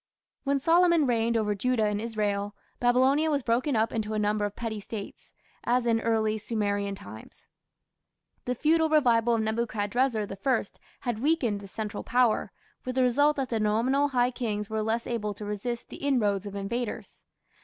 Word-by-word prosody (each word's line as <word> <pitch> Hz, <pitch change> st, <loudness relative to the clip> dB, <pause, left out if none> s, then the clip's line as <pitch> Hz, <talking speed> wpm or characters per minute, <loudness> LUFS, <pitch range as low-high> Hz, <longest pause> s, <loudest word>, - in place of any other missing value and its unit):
When 280 Hz, 0 st, +2 dB
Solomon 335 Hz, +1 st, +4 dB
reigned 235 Hz, -2 st, +1 dB
over 210 Hz, -2 st, +1 dB
Judah 225 Hz, +2 st, +1 dB
and 210 Hz, 0 st, -1 dB
Israel, 205 Hz, -3 st, -2 dB, 0.2 s
Babylonia 260 Hz, +6 st, +3 dB
was 285 Hz, -3 st, 0 dB
broken 245 Hz, +4 st, +1 dB
up 220 Hz, +1 st, +1 dB
into 220 Hz, -1 st, -2 dB
a -, -, 0 dB
number 210 Hz, 0 st, +1 dB
of 205 Hz, -, -5 dB
petty 225 Hz, -2 st, -4 dB
States, 205 Hz, 0 st, -8 dB, 0.3 s
as 245 Hz, 0 st, +1 dB
in 225 Hz, -1 st, +2 dB
early 220 Hz, -1 st, +1 dB
Sumerian 205 Hz, -2 st, -1 dB
times. 110 Hz, -, -12 dB, 1.0 s
The 250 Hz, -, -1 dB
feudal 320 Hz, +4 st, +2 dB
revival 240 Hz, -6 st, +3 dB
of 225 Hz, -, 0 dB
Nebuchadrezzar 220 Hz, +1 st, 0 dB
I 215 Hz, +6 st, 0 dB, 0.4 s
had 240 Hz, -4 st, -2 dB
weakened 255 Hz, -7 st, +1 dB
the 200 Hz, -, -9 dB
central 210 Hz, +1 st, -5 dB
power, 245 Hz, -2 st, +2 dB, 0.3 s
with 255 Hz, 0 st, -4 dB
the 260 Hz, -, +3 dB
result 285 Hz, +5 st, +3 dB
that 270 Hz, -2 st, -2 dB
the 225 Hz, -, -1 dB
nominal 235 Hz, +7 st, +2 dB
high 250 Hz, -2 st, +1 dB
kings 215 Hz, -4 st, -3 dB
were 220 Hz, 0 st, 0 dB
less 225 Hz, +2 st, -1 dB
able 210 Hz, -4 st, -3 dB
to 210 Hz, -, -7 dB
resist 210 Hz, +4 st, -4 dB
the -, -, -9 dB
inroads 210 Hz, -8 st, 0 dB
of 200 Hz, -, -7 dB
invaders. 220 Hz, +4 st, -4 dB
230 Hz, 170 wpm, -27 LUFS, 210-255 Hz, 1.0 s, Solomon